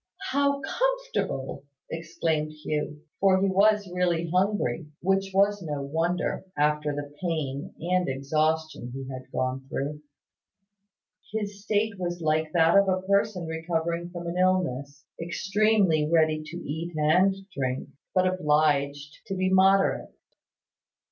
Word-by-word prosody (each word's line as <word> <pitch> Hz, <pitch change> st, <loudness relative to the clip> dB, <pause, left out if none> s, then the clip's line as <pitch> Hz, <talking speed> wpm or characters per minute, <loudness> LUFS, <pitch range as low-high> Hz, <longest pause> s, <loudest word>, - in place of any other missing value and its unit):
"How 280 Hz, +1 st, +2 dB
comfortable!" -, -, -2 dB, 0.3 s
exclaimed 160 Hz, -1 st, -2 dB
Hugh; 150 Hz, 0 st, -4 dB, 0.2 s
for 190 Hz, -1 st, +4 dB
he 195 Hz, -, +2 dB
was 205 Hz, +2 st, +3 dB
really 175 Hz, -2 st, 0 dB
hungry; 180 Hz, -, +1 dB
which 195 Hz, +1 st, +1 dB
was 200 Hz, +1 st, +3 dB
no 150 Hz, -4 st, -3 dB
wonder, 165 Hz, +5 st, -1 dB
after 150 Hz, 0 st, +2 dB
the 145 Hz, 0 st, -5 dB
pain 155 Hz, -6 st, -3 dB
and 180 Hz, 0 st, +1 dB
exhaustion 155 Hz, 0 st, -1 dB
he 135 Hz, -1 st, -6 dB
had 130 Hz, 0 st, -9 dB
gone 130 Hz, +1 st, -2 dB
through. 150 Hz, +2 st, -3 dB, 1.3 s
His 205 Hz, -2 st, -4 dB
state 210 Hz, -1 st, 0 dB
was 175 Hz, -1 st, -3 dB
like 155 Hz, -1 st, 0 dB
that 165 Hz, 0 st, +4 dB
of 200 Hz, -1 st, +2 dB
a 185 Hz, 0 st, 0 dB
person 200 Hz, -2 st, +1 dB
recovering 165 Hz, +1 st, -2 dB
from 175 Hz, -1 st, -7 dB
an 170 Hz, +1 st, -3 dB
illness 150 Hz, -6 st, 0 dB, 0.2 s
extremely 190 Hz, -2 st, +2 dB
ready 155 Hz, -2 st, +3 dB
to 170 Hz, -, -7 dB
eat 165 Hz, +2 st, -5 dB
and 180 Hz, +6 st, +4 dB, 0.2 s
drink, 130 Hz, -1 st, -2 dB, 0.3 s
but 185 Hz, 0 st, +4 dB
obliged 150 Hz, -4 st, +1 dB
to 195 Hz, -, -3 dB
be 185 Hz, 0 st, 0 dB
moderate. 195 Hz, +1 st, +4 dB
170 Hz, 130 wpm, -27 LUFS, 150-190 Hz, 1.3 s, for